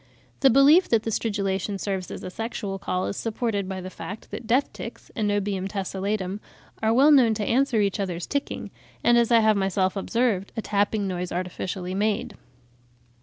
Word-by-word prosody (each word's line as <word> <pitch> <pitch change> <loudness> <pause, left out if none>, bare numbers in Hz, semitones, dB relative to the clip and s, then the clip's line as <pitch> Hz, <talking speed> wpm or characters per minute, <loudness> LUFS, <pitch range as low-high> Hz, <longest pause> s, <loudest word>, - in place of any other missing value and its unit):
The 270 - +6
belief 285 +8 +6
that 225 -2 +3
the 225 - -2
stridulation 200 -2 -1
serves 190 -2 -3
as - - -7
a 185 - -6
sexual 205 -2 -4
call 185 -1 -2
is - - -3
supported 215 -3 -2
by 190 -1 -4
the 185 +1 -7
fact 205 +3 -8
that 230 - -6
death 255 +5 +2
ticks - - -9
(Anobium 205 -3 -1
tessellatum) 195 0 -3 0.4
are 220 - +2
well 270 +6 +6
known 245 -6 +5
to 210 -1 -2
answer 245 -2 +2
each 200 0 0
other's 180 -3 -3
ticking, 280 0 -3 0.3
and, 240 - +5
as 235 0 +3
I 230 -1 +6
have 215 -1 +4
myself 190 -1 +1
observed, 205 -1 0
a - - 0
tapping 205 0 0
noise 180 -1 -3
artificially 180 +1 -4
made. 210 +2 0
205 Hz, 175 wpm, -25 LUFS, 190-230 Hz, 0.4 s, The